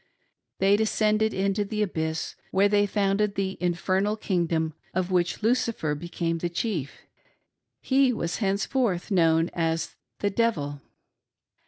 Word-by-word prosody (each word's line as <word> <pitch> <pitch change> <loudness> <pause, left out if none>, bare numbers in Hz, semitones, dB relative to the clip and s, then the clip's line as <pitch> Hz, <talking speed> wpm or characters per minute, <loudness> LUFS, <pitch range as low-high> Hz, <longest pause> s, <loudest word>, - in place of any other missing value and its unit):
They 195 +2 +4
descended 215 0 +2
into 195 +2 0
the 210 +1 -1
abyss, 160 -4 -3
where 195 +2 +3
they 205 0 +3
founded 200 0 +1
the 190 -1 -1
infernal 185 +4 0
Icingdom, 165 -6 0 0.2
of 185 0 -1
which 180 +3 0
Lucifer 225 -9 +1
became 165 +1 -3
the 175 - -2
chief: 170 - -3 0.4
— - - -50 0.3
he 265 -1 +3
was 170 -7 -2
henceforth 200 -1 0
known 165 -2 +3
as 165 -1 -1 0.2
the 205 - -1
Devil. 155 -11 0
190 Hz, 130 wpm, -26 LUFS, 170-210 Hz, 0.4 s, They